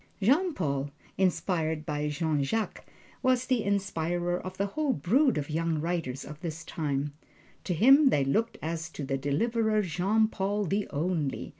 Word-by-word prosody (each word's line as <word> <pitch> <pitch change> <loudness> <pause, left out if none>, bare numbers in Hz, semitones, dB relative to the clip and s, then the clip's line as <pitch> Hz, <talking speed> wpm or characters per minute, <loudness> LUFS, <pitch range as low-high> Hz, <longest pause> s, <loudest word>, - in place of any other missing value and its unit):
Jean 290 - +3
Paul, 140 -4 -1 0.3
inspired 165 -4 0
by 150 0 -1
Jean 150 -1 0
Jacques, 220 +10 -2 0.3
was 255 -1 +2
the 255 -3 +1
inspirer 175 -3 0
of 185 0 -7
the 200 - +1
whole 285 +7 0
brood 245 - +2
of 145 +1 -3
young 165 0 0
writers 160 -5 -2
of 150 +2 -10
his 165 -2 -5
time. 145 -3 -2 0.5
To 180 - -1
him 270 - +7
they 140 - +2
looked 220 +12 0
as 165 +1 -3
to 150 - -5
a 135 0 -1
Deliverer. 215 - +1
Jean 195 +5 +2
Paul 205 0 -1
the 200 +4 -1
Only! 155 -2 -2
175 Hz, 160 wpm, -29 LUFS, 150-215 Hz, 0.5 s, him